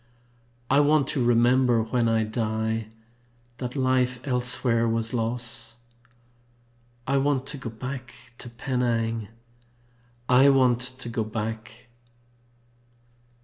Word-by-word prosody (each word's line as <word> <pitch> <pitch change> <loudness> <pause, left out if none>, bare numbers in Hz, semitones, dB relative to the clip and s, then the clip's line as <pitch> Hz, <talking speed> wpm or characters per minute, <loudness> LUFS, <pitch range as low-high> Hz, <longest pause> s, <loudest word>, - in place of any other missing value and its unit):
I 140 - +4
want 145 0 +4
to 130 - 0
remember 120 0 +3
when 115 +1 0
I 110 -1 +2
die 110 0 -2 0.7
That 125 +1 -5
life 130 -2 +1
elsewhere 125 -2 +1
was 115 0 -1
loss. 115 0 -3 1.3
I 140 +1 +1
want 135 -1 +1
to 145 - -3
go 130 - -5
back 130 +3 -7 0.2
to 120 - -6
Penang! 115 -3 -1 1.0
I 130 +2 +6
want 130 -3 +4
to 125 -1 -3
go 115 -1 -2
back! 110 +2 -6
120 Hz, 105 wpm, -25 LUFS, 115-130 Hz, 1.3 s, I